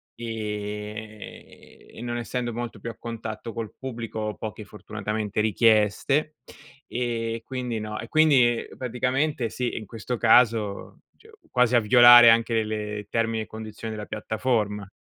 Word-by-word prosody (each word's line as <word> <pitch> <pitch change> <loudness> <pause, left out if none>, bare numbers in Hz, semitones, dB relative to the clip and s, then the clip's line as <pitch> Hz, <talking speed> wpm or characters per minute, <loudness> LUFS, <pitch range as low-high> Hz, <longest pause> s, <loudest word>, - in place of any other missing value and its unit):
e 105 -1 -7
e - - -10
non 120 0 -3
essendo 120 0 -3
molto 120 -1 -6
più 115 - -6
a 115 - -9
contatto 115 -1 -6
col 115 -3 -5
pubblico, 120 -4 -6
ho 105 -1 -3
poche, 110 0 -7
fortunatamente, 105 0 -4
richieste. 110 +8 +2 0.5
E 115 -2 -3
quindi 125 -3 -4
no 105 0 -5
e 115 - -7
quindi 130 -6 +3
praticamente 125 +1 -1
sì, 125 +1 -3
in 110 - -6
questo 115 +3 -5
caso, 110 -3 +2 0.2
cioè, 445 0 -20 0.2
quasi 125 -1 +3
a - - +7
violare 120 +1 +9
anche 115 -1 +2
le 105 -1 -4
termini 115 -1 0
e - - -10
condizioni 110 0 -7
della 105 -1 -7
piattaforma. 105 -4 -2
115 Hz, 140 wpm, -25 LUFS, 105-120 Hz, 0.5 s, violare